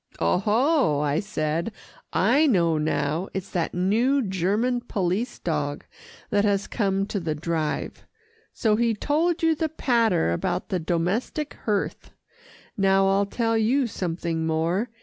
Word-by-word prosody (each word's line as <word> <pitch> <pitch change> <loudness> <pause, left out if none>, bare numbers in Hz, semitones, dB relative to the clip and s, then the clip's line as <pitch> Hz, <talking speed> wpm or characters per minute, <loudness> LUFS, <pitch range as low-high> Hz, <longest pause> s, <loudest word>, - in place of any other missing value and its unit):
"Oho!" 210 - +2
I 150 +1 +1
said. 170 -1 -2 0.4
"I 270 +10 +3
know 170 - +2
now. 150 +3 -1
It's 190 0 -4
that 175 -3 -2
new 230 +10 +2
German 205 +6 0
police 210 +1 -2
dog 150 -3 -3 0.5
that 205 -1 +3
has 200 -1 +1
come 195 -3 0
to 200 - -3
the 160 -3 -2
Drive. 155 0 -3 0.5
So 215 -2 +1
he 230 -1 +2
told 320 +9 0
you 325 0 +4
the 315 +1 -1
patter 230 - +1
about 85 - -2
the 185 -3 0
domestic 180 - -1
hearth. 205 -3 -2 0.7
Now 195 -1 +3
I'll 195 +1 +2
tell 225 +2 0
you 240 +5 +2
something 170 -5 -3
more. 165 +8 0
195 Hz, 135 wpm, -25 LUFS, 165-235 Hz, 0.7 s, you